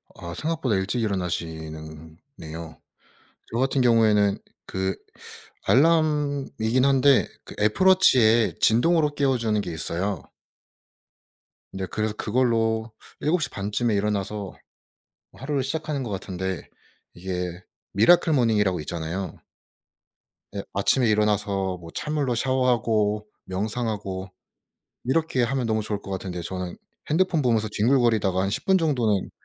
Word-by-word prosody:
아 85 0 -7
생각보다 155 - -1
일찍 95 +6 -1
일어나시는 80 -5 -4 0.2
네요. 80 +1 -8 0.7
저 115 - -2
같은 135 0 +1
경우에는 110 -4 +4 0.3
그 95 0 -2 0.7
알람이긴 145 -5 +2
한데 135 0 +4 0.2
그 - - -11
애플 105 - +2
워치에 120 - +5
진동으로 150 +6 +3
깨워 135 -3 +2
주는 110 -3 0
게 90 - -5
있어요. 85 +2 -2 1.5
네, 95 0 -4
그래서 110 0 -1
그걸로 115 -1 0 0.3
7 165 +4 +1
시 145 - -1
반쯤에 105 +3 -1
일어나서 100 -1 -2 0.8
하루를 140 0 -2
시작하는 150 +1 -3
것 120 - -5
같은데 95 -2 -4 0.5
이게 90 0 -4 0.3
미라클 160 - +5
모닝이라고 105 - +2
있잖아요. 85 +3 -4 1.2
예, 100 - -3
아침에 120 +5 +2
일어나서 100 -3 +1
뭐 85 -1 -11
찬물로 145 -5 -1
샤워하고 115 -5 +1 0.2
명상하고 100 -1 -3 0.8
이렇게 130 0 +1
하면 125 +1 0
너무 110 -1 0
좋을 105 -1 -3
것 95 - -10
같은데 95 -2 -4
저는 90 0 -5 0.3
핸드폰 165 -1 +2
보면서 115 -4 +1
뒹굴거리다가 110 -4 +2
한 95 - 0
10 - - -3
분 190 0 +4
정도는 120 - +1
110 Hz, 280 characters per minute, -25 LUFS, 95-130 Hz, 1.5 s, 워치에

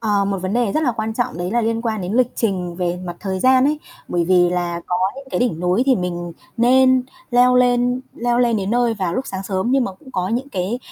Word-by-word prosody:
Ờ, 205 -3 +1
một 195 0 -1
vấn 185 +1 -3
đề 235 -4 +1
rất 310 - +1
là 250 -5 +1
quan 220 0 -3
trọng 240 -9 -2
đấy 175 +1 -3
là 240 +3 +1
liên 230 +1 -1
quan 220 -3 -2
đến 180 +2 -4
lịch 250 +1 +2
trình 180 -6 -2
về 180 -1 -1
mặt 175 -1 -6
thời 190 -2 -3
gian 260 +2 +5
ấy, 300 +1 +1 0.3
bởi 175 -1 0
vì 175 0 +4
là 175 -1 -2
có 180 - 0 0.2
những 275 - -9
cái - - -1
đỉnh 230 -10 0
núi 180 +6 +2
thì 265 - +5
mình 175 -1 -4 0.2
nên 255 +2 +4 0.3
leo 250 +1 +5
lên 245 0 +2
leo 240 0 0
lên 240 -2 +3
đến 195 -1 -2
nơi 240 -1 +2
vào 185 -5 -2
lúc 260 - -2
sáng 190 0 -5
sớm, 190 +4 -2
nhưng 265 -1 +3
mà 195 - -4
cũng 260 +8 -16
có 185 -2 -1
những 245 +5 -2
cái 195 +1 -2
220 Hz, 260 wpm, -20 LUFS, 180-245 Hz, 0.3 s, gian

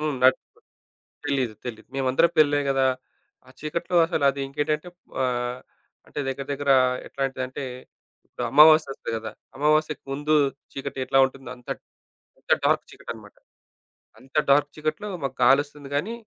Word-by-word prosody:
హ్మ్ 150 -2 -1
నాట్టు 130 +1 +5 0.9
తెలీదు. 130 -6 0
తెలీదు. 115 -3 -7
మేమందరం 135 +5 +3
పెళ్లే 145 -1 +5
గదా! 135 -1 +3 0.6
ఆ - - -15
చీకట్లో 170 +3 -2
అసలది 140 -5 +1
ఇంకేంటంటే 150 +4 -2 0.4
ఆహ్, 125 0 -2 0.5
అంటే 145 - -5
దగ్గర 135 +1 -4
దగ్గర 140 0 -1 0.4
ఎట్లాంటిదంటే, 135 0 -3 0.6
ఇప్పుడు - - -6
అమావాస్య 155 0 +7
ఒస్తది - - -6
గదా! 110 -1 -6 0.2
అమావాస్యకు 155 +1 +1
ముందు 145 +2 0 0.4
చీకటి 135 -1 -5
ఎట్లా 135 +1 +3
ఉంటుందో 135 -2 -10
అంత, 125 - -21 0.7
అంత - - -2
డార్క్ - - +2
చీకటి - - -10
అనమాట. - - -15 0.8
అంత 130 +4 -21 0.2
డార్క్ 145 +1 +4
చీకట్లో 155 +7 -3 0.2
మాకు 130 - -4
కాలోస్తుంది 145 +1 +2
గానీ 200 +11 -1
140 Hz, 135 wpm, -25 LUFS, 130-150 Hz, 0.9 s, అమావాస్య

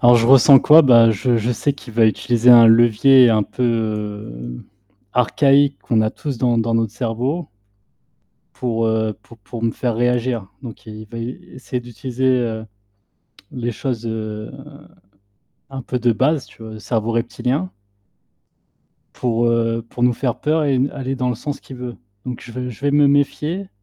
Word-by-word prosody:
Alors 120 0 +6
je 115 - +2
ressens 135 +1 +7
quoi? 160 +2 +7
Beh, 115 -4 +5
je 120 +4 0
je 115 +2 -1
sais 140 +5 -1
qu'il 135 -4 -13
va 115 -1 +4
utiliser 120 +2 +2
un 120 -1 +8
levier 120 +3 +5
un 110 -1 +2
peu, 125 - -6
heu, 105 - -4 0.5
archaïque 140 +3 +2
qu'on 115 -2 0
a 110 0 0
tous 140 -1 -6
dans 120 -1 +1
dans 115 0 -1
notre 115 -2 0
cerveau 130 +7 -3 1.0
pour, 115 -2 -2
heu, 110 -1 -1
pour 115 - -17
pour 115 +2 -9
me 115 -1 0
faire 120 -3 -2
réagir. 120 -2 -1 0.2
Donc 115 -3 -11
il 110 0 -10
va 115 - -7
essayer 125 +1 -7
d'utiliser 120 -1 -2 0.9
les 120 -2 -4
choses, 120 0 -4
heu, 110 -1 -5 1.2
un 135 -1 -7
peu 125 +1 -3
de 120 0 +2
base 140 +6 0
tu - - -17
vois, 110 0 -9
le - - -9
cerveau 110 0 -2
reptilien, 125 +8 -2 1.4
pour, 120 -1 -1
heu, 115 0 0
pour 120 - -8
nous 125 0 +3
faire 125 0 -3
peur 155 +1 0
et 140 - +1
n 130 +2 +1
aller 135 -1 -4
dans 125 -1 -2
le 125 - -2
sens 145 +5 -6
qu'il 135 - -12
veut. 125 -1 -7 0.3
Donc 125 -2 -6
je 120 - -11
vais 125 +1 -5
je 115 - -14
vais 145 0 0
me 145 0 +4
méfier 150 +6 -1
120 Hz, 175 wpm, -19 LUFS, 115-130 Hz, 1.4 s, un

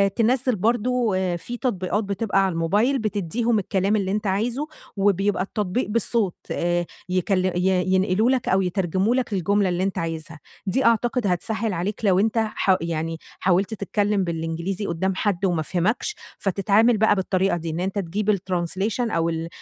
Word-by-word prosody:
تنَزِّل 250 +2 +2
برضو 235 +3 +1 0.3
في 240 +8 -7
تطبيقات 205 -4 -1
بتبقى 200 0 0
على 190 - -1
الموبايل 205 +11 +1
بتدّيهم 215 +2 0
الكلام 195 +1 0
اللي 195 -3 0
أنتَ 210 +1 -1
عايزه، 235 +9 -1 0.3
وبيبقى 195 0 +2
التطبيق 200 +3 -2
بالصوت 220 -3 +1 0.2
آآ، 175 0 0 0.2
يكل 185 +1 +1
ي 180 0 +1
ينقلوا 190 +4 +2
لك 260 -2 0
أو 190 - +3
يترجموا 190 +4 0
لك 255 -4 -1
الجملة 200 +1 +2
اللي 180 +1 0
أنتَ 195 0 -1
عايزها، 160 -2 -4 0.3
دي 260 +8 +1
أعتقد 235 0 +2
هتسهِّل 200 +4 -1
عليك 195 +6 -3
لو 190 -2 +4
أنتَ 220 +3 +1
ح 215 -3 +2
يعني 165 0 -2 0.2
حاولت 190 +3 +2
تتكلّم 205 -1 0
بالإنجليزي 170 +3 -3
قدّام 190 +2 -1
حد 195 -1 0
وما 175 -4 +1
فهمكش، 185 - -1 0.2
فتتعامل 205 +4 +3
بقى 215 0 +4
بالطريقة 190 -1 +1
دي، 165 -1 -5
إن 160 +1 -3
أنتَ 190 +3 -1
تجيب 200 +4 0
الtranslation 185 +5 -2
أو 165 -2 +1
ال 165 0 -3
195 Hz, 160 wpm, -23 LUFS, 180-220 Hz, 0.3 s, لو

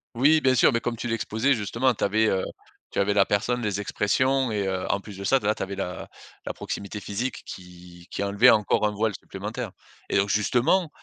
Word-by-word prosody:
Oui, 145 +6 +5
bien 130 -3 +3
sûr. 120 - +5
Mais, 115 - +1
comme 120 0 -3
tu 120 - -5
l'exposais, 115 +3 +1
justement, 115 +3 0
tu - - -5
avais, 110 +2 +2
heu, 95 -3 +1 0.5
tu - - -2
avais 100 +1 +2
la 100 -1 +4
personne, 120 +4 0
les 105 -2 -1
expressions 130 +6 +1
et 105 -2 -1
heu, 95 -1 -2
en 100 +1 0
plus 100 -1 -11
de 100 - -6
ça, 135 +6 +4
d 105 - -10
là, 105 - +3
tu - - -9
avais 100 +1 -5
la 90 -2 -5 0.4
la - - -3
proximité 100 +1 -6
physique 115 +7 -4
qui 90 -1 -12
qui - - -3
enlevait 100 +5 +5
encore 105 -1 +3
un - - -1
voile 110 +1 0
supplémentaire - - -6 0.4
et - - -1
donc, 100 +1 +2
justement, 125 - +2
105 Hz, 225 wpm, -25 LUFS, 100-120 Hz, 0.5 s, Oui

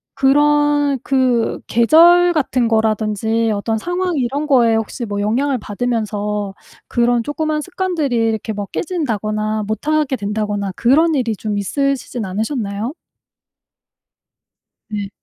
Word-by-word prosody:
그런 290 0 +3
그 255 -4 +1
계절 345 +9 +5
같은 255 -5 +1
거라든지 220 0 0
어떤 215 +2 -1
상황 355 +5 -2
이런 275 +4 -1
거에 235 -5 +4
혹시 225 +2 -3
뭐 205 -1 -3
영향을 255 +6 0
받으면서 210 -2 -2 0.4
그런 240 -1 +2
쪼끄만 305 +2 -2
습관들이 355 -6 -2
이렇게 225 -1 0
뭐 205 -1 -4
깨진다거나 215 - -2
못하게 280 +5 -1
된다거나 205 -1 -2
그런 310 +7 +3
일이 235 -6 -1
좀 210 -2 -3
있으시진 255 +1 -2
않으셨나요? 215 +3 -3 2.0
네. 205 -2 -4
235 Hz, 270 characters per minute, -18 LUFS, 215-290 Hz, 2.0 s, 계절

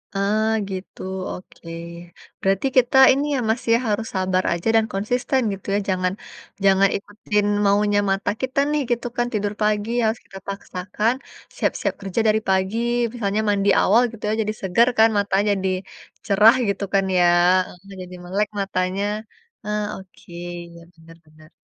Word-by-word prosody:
Ah, 210 +2 +1 0.2
gitu, 190 0 -7 0.3
oke. 180 -2 -12 0.7
Berarti 195 +6 +1
kita 250 +1 +4 0.2
ini 280 +2 -1
ya - - 0
Mas 225 +2 +1
ya, - - +5
harus 215 +1 -1
sabar 185 0 +1
aja 170 +4 -4
dan 225 -1 +4
konsisten 245 +6 0
gitu 195 - -10
ya, - - +2
jangan 185 -1 0 0.5
jangan 195 0 +5
ikutin 205 0 -2 0.2
maunya 205 +1 +3
mata 195 0 0
kita 260 +1 -1
nih 300 -1 +1
gitu 240 0 -1
kan, 240 0 +1
tidur 205 -1 -1
pagi 210 0 +1
harus 220 +1 0
kita 195 - -11
paksakan, 200 +3 -2 0.4
siap-siap - - -1
kerja 195 +3 -1
dari 215 0 +3
pagi, 190 +3 +1 0.4
misalnya 210 -3 -1
mandi 200 0 +2
awal 220 +5 +4
gitu 230 -3 -13
ya, - - +1
jadi 215 0 -2
seger 215 +6 +3
kan 225 +1 +7
matanya 200 0 +1
jadi, 190 -1 -1 0.6
cerah 210 +4 +6
gitu 200 0 -1
kan 195 0 +3
ya, 175 - +5 0.6
e - - -11
jadi 180 0 -9
melek 200 +4 0
matanya. 190 0 -1 0.6
Ah 210 0 -1
oke, 190 -2 -15 0.4
ya 170 - -13
benar 165 0 -16
benar. 155 0 -19
200 Hz, 160 wpm, -22 LUFS, 190-220 Hz, 0.7 s, kan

